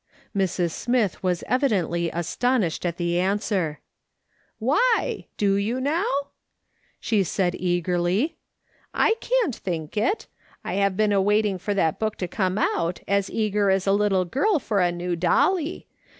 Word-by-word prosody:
Mrs. 180 Hz, -3 st, 0 dB
Smith 235 Hz, 0 st, 0 dB
was 180 Hz, -2 st, -1 dB
evidently 185 Hz, -, +1 dB
astonished 180 Hz, +2 st, 0 dB
at 170 Hz, 0 st, -3 dB
the 175 Hz, 0 st, 0 dB
answer, 190 Hz, -4 st, -1 dB, 0.4 s
" -, -, -41 dB
Why? 315 Hz, -, +1 dB
Do 200 Hz, -1 st, +2 dB
you 220 Hz, +6 st, -1 dB
now? 305 Hz, +8 st, 0 dB, 0.5 s
" -, -, -51 dB, 0.3 s
she 210 Hz, -3 st, +1 dB
said 180 Hz, 0 st, 0 dB
eagerly, 180 Hz, -, 0 dB, 0.3 s
" -, -, -46 dB, 0.3 s
I 445 Hz, -, +4 dB
can't 470 Hz, -, +1 dB
think 165 Hz, -3 st, -5 dB
it, 230 Hz, -, 0 dB, 0.4 s
I -, -, -3 dB
have 200 Hz, -1 st, +1 dB
been 215 Hz, -1 st, +2 dB
awaiting 205 Hz, 0 st, +2 dB
for 205 Hz, +3 st, -2 dB
that 165 Hz, -5 st, +1 dB
book 215 Hz, -1 st, -1 dB
to 180 Hz, -, -3 dB
come 185 Hz, +1 st, -1 dB
out 175 Hz, -4 st, 0 dB
as 200 Hz, 0 st, +1 dB
eager 210 Hz, -2 st, +1 dB
as 190 Hz, 0 st, +2 dB
a 195 Hz, -, +3 dB
little 200 Hz, -2 st, +2 dB
girl 330 Hz, -, +1 dB
for 215 Hz, -8 st, -1 dB
a 175 Hz, -1 st, +3 dB
new 175 Hz, 0 st, -3 dB
dolly. 305 Hz, -, +1 dB
195 Hz, 155 wpm, -24 LUFS, 175-225 Hz, 0.5 s, I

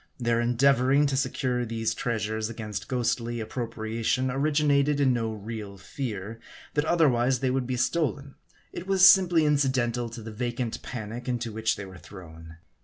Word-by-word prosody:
Their 120 Hz, -1 st, +1 dB
en 120 Hz, +1 st, 0 dB
deavoring 140 Hz, +2 st, +4 dB
to 135 Hz, -, -1 dB
secure 130 Hz, -2 st, -1 dB
these 115 Hz, -1 st, -2 dB
treasures 110 Hz, -2 st, -2 dB
against 110 Hz, -3 st, -6 dB
ghostly 120 Hz, -2 st, -1 dB
appro 115 Hz, +1 st, -4 dB
priation 115 Hz, +4 st, -1 dB
originated 145 Hz, 0 st, +2 dB
in 135 Hz, -3 st, +3 dB
no 115 Hz, -2 st, -1 dB
real 105 Hz, -2 st, -7 dB
fear, 110 Hz, 0 st, -6 dB, 0.3 s
that 150 Hz, 0 st, +1 dB
otherwise 135 Hz, -7 st, +3 dB
they 130 Hz, 0 st, 0 dB
would 130 Hz, -1 st, -1 dB
be 130 Hz, -1 st, -2 dB
stolen: 140 Hz, +2 st, -1 dB, 0.4 s
it 180 Hz, -, -7 dB
was 190 Hz, -1 st, +7 dB
simply 180 Hz, -5 st, +6 dB
incidental 130 Hz, -5 st, +1 dB
to 115 Hz, -1 st, -9 dB
the 110 Hz, -, -7 dB
vacant 120 Hz, +1 st, -3 dB
panic 120 Hz, +1 st, -6 dB
into 120 Hz, -2 st, -2 dB
which 110 Hz, 0 st, 0 dB
they 100 Hz, -, -7 dB
were 95 Hz, -1 st, -12 dB
thrown. 80 Hz, -4 st, -12 dB
120 Hz, 165 wpm, -27 LUFS, 110-135 Hz, 0.4 s, was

